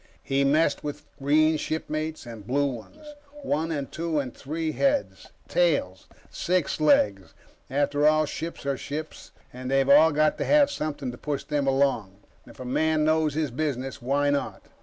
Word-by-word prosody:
He 135 0 +1
messed 145 +2 +2
with 150 0 -5 0.2
green 155 +3 +3
shipmates 155 -1 -4
and 115 -3 -10
blue 145 +3 +1
ones. 140 - -7 0.4
One 165 - -1
and 140 -3 -3
two 165 -1 -2
and 130 -4 -5
three 155 +3 -3
heads, 280 - 0 0.2
tails, - - 0 0.2
six 180 -3 -1
legs 100 - +2 0.3
after 145 +2 +2
all, 155 0 +4
ships 165 0 -6
are 140 -1 -1
ships 155 +4 -7 0.2
and 125 +1 -6
they've 135 0 +2
all 150 +3 +7
got 155 +1 +2
to - - -1
have 290 -1 +4
something 145 - -4
to 120 - -11
push 145 -2 -3
them 145 -2 -1
along. 135 -8 +1 0.3
If - - -15
a 130 - -7
man 155 +4 +1
knows 155 -2 +2
his 155 -4 -1
business, 135 -1 -3
why 140 +3 +1
not? 145 - -2
145 Hz, 165 wpm, -26 LUFS, 135-155 Hz, 0.4 s, all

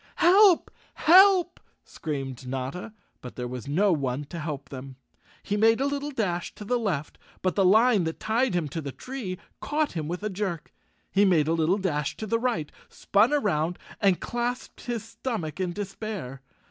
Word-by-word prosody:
"Help! 375 +1 +5 0.2
Help!" 365 0 +6 0.2
screamed 135 -4 -5
Notta, 135 - -4 0.3
but 125 - -9
there 125 -1 -4
was 125 +1 -7
no 185 +7 +3
one 135 -2 -1
to 165 +4 -8
help 150 -3 -5
them. 135 0 -8 0.5
He 205 - -1
made 225 +2 +4
a 270 - +1
little 285 +1 -2
dash 195 -10 -2
to 210 - -9
the 245 +3 +1
left, 165 -10 -3 0.2
but 185 - +1
the 195 - +2
line 215 0 +5
that 160 - -4
tied 230 -1 +1
him 170 -4 0
to 165 +4 -4
the 140 -2 -5
tree 235 - -6 0.2
caught 300 0 -1
him 155 -3 -4
with 180 +4 -4
a 215 - -1
jerk. 185 -5 -4 0.4
He 200 - +4
made 170 -6 +4
a 160 - +2
little 165 +4 +2
dash 150 -7 -2
to 220 - -4
the 230 +2 0
right, 230 -12 -1 0.2
spun 205 +6 +2
around 180 - +1 0.2
and 195 -4 +3
clasped 240 +1 -4
his 235 -3 -2
stomach 220 - -4
in 185 -2 -1
despair. 195 - -6
190 Hz, 180 wpm, -26 LUFS, 150-230 Hz, 0.5 s, Help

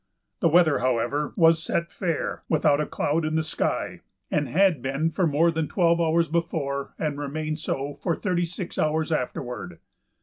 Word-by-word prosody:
The 165 - +3
weather, 160 -2 +4
however, 130 +4 0
was 165 -3 +5
set 170 +1 -2
fair, 170 -5 -2
without 150 -2 +3
a 150 - -2
cloud 160 +3 0
in 155 0 -1
the 160 - +2
sky, 160 - -2 0.3
and 145 -2 0
had 180 -5 +3
been 140 +5 -1
for 180 +1 +1
more 160 +3 +3
than 160 -2 -1
twelve 170 -2 +2
hours 165 0 +2
before 155 -4 -2
and 150 -2 -2
remained 155 +2 -3
so 145 -2 -3
for 170 -3 0
thirty 175 -3 -1
six 175 +1 -6
hours 155 +1 +1
afterward. 125 -3 -3
160 Hz, 170 wpm, -25 LUFS, 145-170 Hz, 0.3 s, was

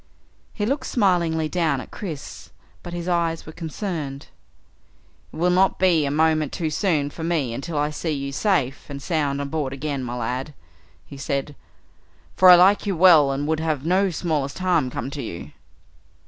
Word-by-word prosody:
He 205 - -3
looked 275 +6 -1
smilingly 170 -7 +1
down 160 -5 0
at - - -10
Chris 160 -9 -7 0.3
but 175 - -8
his 175 0 -5
eyes 170 -2 0
were 155 - -9
concerned. 160 -4 -5 1.0
"It - - -13
will 175 +2 +1
not 185 +1 +3
be 175 -5 +3
a - - -1
moment 155 0 +2
too 160 -3 -3
soon 150 -5 0
for 160 - -8
me 160 -8 -1
until 150 +6 -5
I 150 +1 0
see 155 +2 -4
you 140 -2 -3
safe 145 - -1
and 140 -1 -6
sound 145 -3 -1
on 140 0 -4
board 145 -4 -2
again, 140 -1 -3
my 120 0 -4
lad," 125 +5 -4 0.5
he 140 - -11
said, 140 +1 -3 0.8
"for 185 - +7
I 180 - +11
like 195 +4 +4
you 195 -4 -1
well 160 -5 +7
and 140 +2 -2
would 160 0 0
have 155 -3 -2
no 190 +3 +2
smallest 155 -5 -2
harm 175 -8 +1
come 125 +2 -5
to 140 - -5
you." 85 - -7
155 Hz, 180 wpm, -23 LUFS, 140-175 Hz, 1.0 s, I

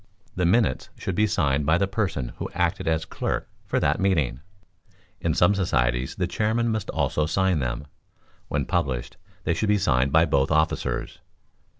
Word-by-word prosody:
The 90 -2 +1
minutes 95 - +2
should 95 - -3
be 105 +4 +2
signed 75 -6 +1
by 80 +2 +4
the 100 - +2
person 95 - -2
who - - -4
acted - - 0
as 80 0 +1
clerk - - -3 0.2
for - - +1
that - - +1
meeting: 75 -11 +1 0.8
in - - 0
some 90 +3 +4
societies 65 -9 0
the 90 - 0
chairman 110 +6 0
must 110 -3 -2
also 75 0 0
sign 95 -1 +1
them. 60 +1 -3 0.6
When - - -1
published, 60 -3 -2 0.3
they - - +1
should 105 - -1
be 105 - +4
signed 65 -6 +2
by 80 +2 +5
both 70 -3 +2
officers. 80 0 0
80 Hz, 170 wpm, -25 LUFS, 70-95 Hz, 0.8 s, by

